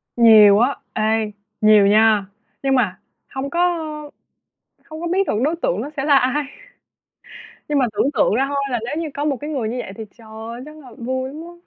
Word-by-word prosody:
Nhiều 215 -3 +7
á. 250 +4 +2 0.2
Ê, 220 0 0 0.3
nhiều 215 -2 +6
nha. 215 -1 +4 0.4
Nhưng 270 -1 +2
mà 205 -7 0 0.3
hông 270 0 -5
có 340 - -3 1.3
hông 315 0 -9
có 345 - -3
biết 375 +3 0
được - - 0
đối 310 +4 +1
tượng 210 - -1
nó 280 - -5
sẽ 270 - -2
là 285 -2 +5
ai. 270 +3 +1 1.2
Nhưng 295 -1 +1
mà 255 - +3
tưởng 215 +7 +1
tượng - - +2
ra 265 - +2
thôi 280 0 -2
là 240 - 0
nếu 245 - -4
như 315 - -4
có 290 +1 -3
một 285 -3 0
cái 295 - -5
người 260 -8 -2
như 245 - -4
vậy 190 - -6
thì 225 - -6
trời 225 -2 -16
ơi, 225 +2 -8
chắc 305 +1 -12
là 270 -5 -14
vui 260 +2 -3
lắm 310 - -8
á. 345 +1 -11
255 Hz, 215 wpm, -20 LUFS, 220-290 Hz, 1.3 s, Nhiều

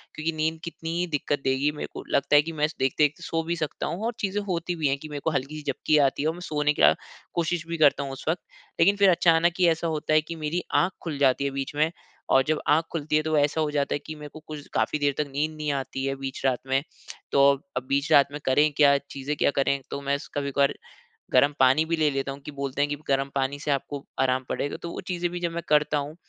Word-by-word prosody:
क्योंकि 160 +2 -1
नींद 160 +1 -1
कितनी 165 -1 -6
ही 180 - 0
दिक्कत 145 -2 -1
देगी 135 +2 +2
मेरे 150 - -6
को - - -7
लगता 140 - +3
है 145 - +8
कि 165 - -5
मैं 150 -1 +1
स 155 - -11
देखते 140 +3 +3
सो 165 -1 -1
भी 170 +1 -2
सकता 155 -3 -3
हूँ। 200 +6 -3
और 235 - -1
चीज़ें 200 +1 -1
होती 175 -1 -2
भी 155 -4 0
हैं 135 - +1
कि 155 - -9
मेरे 145 -1 -5
को 160 - +2
हल्की 140 +2 -2
सी 145 -2 -2
झपकी 155 +3 +1
आती 140 -1 +2
है - - +1
और - - -2
मैं 175 - -10
सोने 150 -3 0
का - - +6
अ, - - +2 0.4
कोशिश 170 -1 -1
भी 170 0 -3
करता 145 -2 +4
हूँ 135 - -5
उस 135 - -9
वक़्त। 170 +2 0 0.4
लेकिन 200 +4 +5
फिर 200 -1 +6
अचानक 170 -1 +4
ही 180 - +5
ऐसा 165 +1 0
होता 155 -1 -1
है 155 - +5
कि 165 +2 -7
मेरी 160 +3 -2 0.2
आँख 180 - +1
खुल 160 -4 -4
जाती 140 0 +3
है 140 - 0
बीच 135 +1 -4
में 155 +2 +2 0.4
और 135 - +5
जब 155 0 +1
आँख 155 +3 +4
खुलती 155 -1 -1
है - - +2
तो 155 -1 +1
ऐसा 145 +2 +2
हो 150 -1 0
जाता 145 -1 0
है - - -2
कि 155 - -5
मेरे 150 -1 -9
को 155 - -9
कुछ 150 -2 -8
काफ़ी 150 - 0
देर 145 -1 +2
तक 150 -1 -1
नींद 155 +2 -1
नहीं 150 -1 -1
आती 135 0 -3
है 135 - -1
बीच 135 -1 -6
रात 130 -2 +2
में। 135 +1 +2 0.5
तो 140 - +5 0.3
अब 125 - -1
बीच 140 +3 0
रात 140 -2 +7
में 150 - -5
करें 150 +3 +4
क्या, 140 -2 +6
चीज़ें 140 +1 -5
क्या - - +3
करें, 140 0 +1
तो 140 - -4
मैं 140 0 0
स - - -11
कभी-कभार 140 -1 +1 0.6
गरम 140 +3 +5
पानी 130 +4 +5
भी 165 +1 0
ले 155 -1 +3
लेता 135 0 -2
हूँ 135 - -8
कि - - -6
बोलते 140 0 -3
हैं 145 - +2
कि 145 - -1
गरम 135 0 +1
पानी 135 +1 0
से 145 - -2
आपको 140 0 -2 0.2
आराम 130 0 +2
पड़ेगा 145 - -2
तो 170 - -5
वो - - -6
चीजें 175 -1 -1
भी 175 - -4
जब 170 -1 -2
मैं 170 0 -3
करता 150 0 +3
हूँ 145 +2 -4
150 Hz, 270 wpm, -26 LUFS, 140-160 Hz, 0.6 s, है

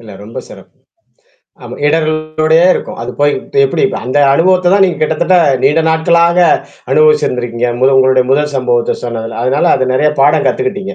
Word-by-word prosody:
இல்ல 115 -2 -14
ரொம்ப 115 +2 -9
சிறப்பு. - - -16 0.9
ஆமா - - -9
இடரள்களோடயே 155 +1 0
இருக்கும். - - -7
அது 120 - -6
போய்ட்டு 145 - -1
எப்படி? 415 - -3 0.2
அந்த 130 +3 -1 0.2
அனுபவத்த 180 +3 +2
தான் 200 -1 +4
நீங்க 180 -3 -2
கிட்டத்தட்ட 160 +4 0 0.3
நீண்ட 165 - +2
நாட்களாக 170 +2 +1 0.5
அனுபவிச்சிருந்திருக்கீங்க. 125 - 0
முது 135 +1 +3
உங்களுடைய 130 -1 +2
முதல் 145 +1 -1
சம்பவத்த 120 -2 -1
சொன்னதுல, 115 -1 -6
அதனால 135 +4 0
அது 130 -1 -2
நெறையா 150 +3 +1
பாடம் 145 +2 +2
கத்துக்கிட்டீங்க 195 0 -4
150 Hz, 150 wpm, -12 LUFS, 130-170 Hz, 0.9 s, தான்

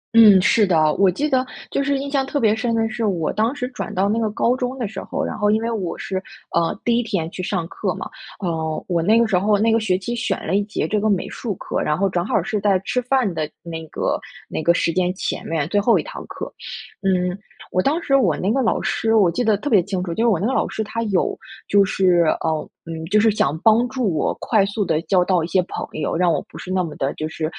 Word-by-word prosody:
嗯， 210 -4 +9
是 210 +3 +4
的， 155 -4 +3
我 195 -1 +5
记 280 - -1
得 260 -3 +2 0.3
就 280 - 0
是 280 0 +1
印 280 +1 -4
象 275 -1 +1
特 280 +2 -2
别 220 -3 +3
深 230 0 -1
的 225 0 +1
是， 225 +1 -3
我 175 -6 0
当 220 +6 +1
时 250 -3 -3
转 255 - -6
到 190 +2 +2
那 215 +3 +1
个 220 -1 0
高 235 +4 +1
中 255 0 -3
的 235 -5 -2
时 195 -1 -7
候， - - -3
然 - - -4
后 210 -1 +1
因 215 +1 +3
为 230 - -1
我 190 -7 -3
是， 190 - -4 0.4
呃， 170 +3 +1
第 235 0 +3
1 - - +2
天 195 -8 -2
去 - - -6
上 180 -2 -2
课 - - -3
嘛， - - -5 0.3
呃， 160 -4 -3
我 175 -2 +1
那 210 +7 +4
个 235 - +3
时 190 -4 +2
候 205 +2 +2
那 225 +3 +2
个 225 - +4
学 195 -5 +1
期 235 +6 -4
选 250 +4 -2
了 170 - -2
1 205 - +2
节 210 - -2
这 210 - 0
个 215 - +1
美 195 -3 0
术 220 -6 -4
课， - - -3
然 150 - 0
后 195 - +2
正 180 -2 -1
好 195 - +1
是 215 -1 -2
在 195 -2 +3
吃 250 - 0
饭 250 -5 +1
的 155 -2 -2
那 165 -1 -6
个 - - -1 0.3
那 - - -3
个 170 - +4
时 165 - +1
间 180 -1 +1
前 - - -3
面， 160 -3 -1
最 205 +1 +2
后 230 +3 +4
1 - - -1
堂 - - -8
课。 - - -7 0.5
嗯， 180 -2 +1 0.4
我 185 - +2
当 305 - +1
时 275 - +2
我 195 - +3
那 195 +4 0
个 270 - +1
老 230 - +1
师 225 0 +1
我 190 -6 +5
记 245 - -1
得 215 -2 +3
特 210 - -6
别 210 -9 +5
清 190 -1 -3
楚， 175 -2 -3
就 225 - 0
是 - - +4
我 205 -8 +3
那 195 - -1
个 260 - +1
老 - - +1
师 220 - -3
她 225 +2 -4
有 200 -5 0 0.3
就 200 0 +5
是， 180 -3 +3 0.2
呃 160 -2 -1 0.2
嗯， 165 -1 -6
就 210 +4 +3
是 220 0 +4
想 155 -7 0
帮 225 +2 +5
助 245 -8 -1
我 - - +1
快 215 -4 +2
速 205 0 -2
地 155 -2 0
交 185 -1 +3
到 180 -3 +2
一 - - -2
些 185 +2 +2
朋 - - -6
友， 155 - -2
让 175 0 +3
我 150 - +1
不 - - -11
是 185 - -7
那 185 -1 +1
么 155 -3 -6
的 135 +1 -1
就 155 - -3
是， 160 0 -4
200 Hz, 285 characters per minute, -21 LUFS, 175-230 Hz, 0.5 s, 嗯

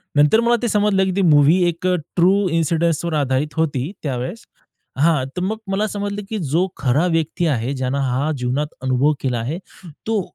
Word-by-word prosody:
नंतर 150 +9 +5
मला 235 +1 +3
ते 240 - 0
समजलं, 205 -2 +2
की 190 - -1
ती 195 - +1
मूव्ही 155 +1 +5
एक 175 +2 -2 0.3
ट्रू 190 +3 +3
इन्सिडन्सवर 165 0 0
आधारित 145 0 0
होती, 155 -2 -1
त्यावेळेस 135 - -4 0.5
हां, 150 -2 +2
तर - - -1
मग 215 +3 -1
मला 210 +2 0
समजलं, 205 0 -4
की 220 - -3
जो 165 +3 0
खरा 140 +5 +1
व्यक्ती 165 +1 0
आहे 130 -1 -1
ज्यांना 130 +1 -2
हा 135 +4 0
जीवनात 125 +4 -1 0.2
अनुभव 130 +3 +2
केला 125 -3 -1
आहे, 135 +9 -3 0.5
तो 220 -3 +1
160 Hz, 175 wpm, -20 LUFS, 135-190 Hz, 0.5 s, नंतर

